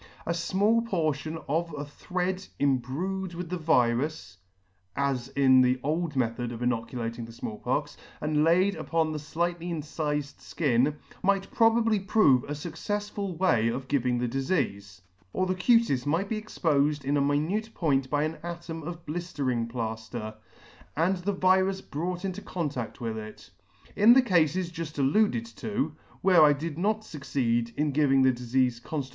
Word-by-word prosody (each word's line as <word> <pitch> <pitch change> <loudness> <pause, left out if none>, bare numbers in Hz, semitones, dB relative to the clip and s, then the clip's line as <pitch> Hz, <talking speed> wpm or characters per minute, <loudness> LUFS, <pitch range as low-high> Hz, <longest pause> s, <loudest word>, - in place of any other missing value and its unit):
A - - -1
fmall 200 +7 +2
portion 160 - -1
of 165 +2 -1
a 145 - -4
thread 180 +5 -3
im 140 -2 +2
brued 180 +8 -4
in 180 -2 -5
the 180 - -2
virus, 125 - +1 0.6
(as 135 -3 -1
in 130 -2 +6
the 125 0 +3
old 155 +1 -1
method 120 -1 -1
of 120 0 -5
inoculating 115 -1 -2
the 115 - -11
Small 110 -2 -6
Pox,) - - -2 0.2
and 150 0 +1
laid 180 +5 +4
upon 165 -1 0
the 150 -1 -5
(lightly 175 0 -1
incifed 150 -3 -4
(kin, 140 -1 +2 0.3
might 195 0 +1
pro 225 -1 +5
bably 225 -4 +1
prove 145 - +5
a 145 - -4
fuccefsful 195 +4 -4
way 140 -12 +3
of 130 +3 -3
giving 125 -3 +1
the 120 0 0
difeafe; 120 - -2 0.3
or 185 - +1
the 185 - 0
cutis 185 - +2
might 170 +7 0
be 215 -1 -2
expofed 150 -8 0
in 140 +2 +1
a 145 - +2
minute 160 +11 0
point 135 -5 +1
by 145 0 +1
an 155 +1 -3
atom 170 -1 -6
of 170 +2 -7
bliftering 140 -8 -2
plafter, 110 -1 -4 0.6
and 180 +4 +2
the 180 +3 -2
virus 190 0 +2
brought 180 +2 -4
in 190 - -1
contadf 150 - -4
with 115 -2 -3
it. 110 0 -11 0.4
In 220 +4 +7
the 260 +1 +6
Cafes 175 - +2
juft 165 -3 -6
alluded 210 - +2
to, 160 -8 -2 0.3
where 180 -3 +6
I 150 -1 +7
did 155 +2 -5
not 215 +3 +1
fucceed 125 - -2
in 150 0 0
giving 135 -2 +3
the 130 0 +5
difeafe 125 0 0
conftitutionally. 140 -2 -4
150 Hz, 165 wpm, -28 LUFS, 130-180 Hz, 0.6 s, In